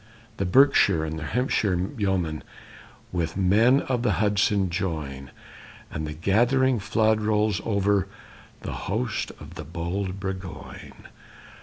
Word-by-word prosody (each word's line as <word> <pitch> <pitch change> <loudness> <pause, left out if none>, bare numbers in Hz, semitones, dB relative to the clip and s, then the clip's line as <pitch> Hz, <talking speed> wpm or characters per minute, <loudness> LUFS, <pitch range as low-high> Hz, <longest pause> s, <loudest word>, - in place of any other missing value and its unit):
The 95 - -1
Berkshire 100 - +4
and 80 0 -5
Hampshire 105 - 0 0.2
yeomen 95 -8 -1 0.7
With 85 -3 -2
the - - -3
men 115 +9 +4
of 125 -2 -1
the 120 - +1
Hudson 100 -2 +1
join, 75 -7 -4 0.6
And 80 0 -4
the 75 - -5
gathering 120 - +2
flood 110 +1 +1
rolls 105 -2 +1
over 100 -2 +1 0.5
The - - -5 0.2
host 110 +3 -1
of - - -11
the - - -7
bold 90 +4 -4
Burgoyne. 95 -2 -7
100 Hz, 125 wpm, -25 LUFS, 85-110 Hz, 0.7 s, Berkshire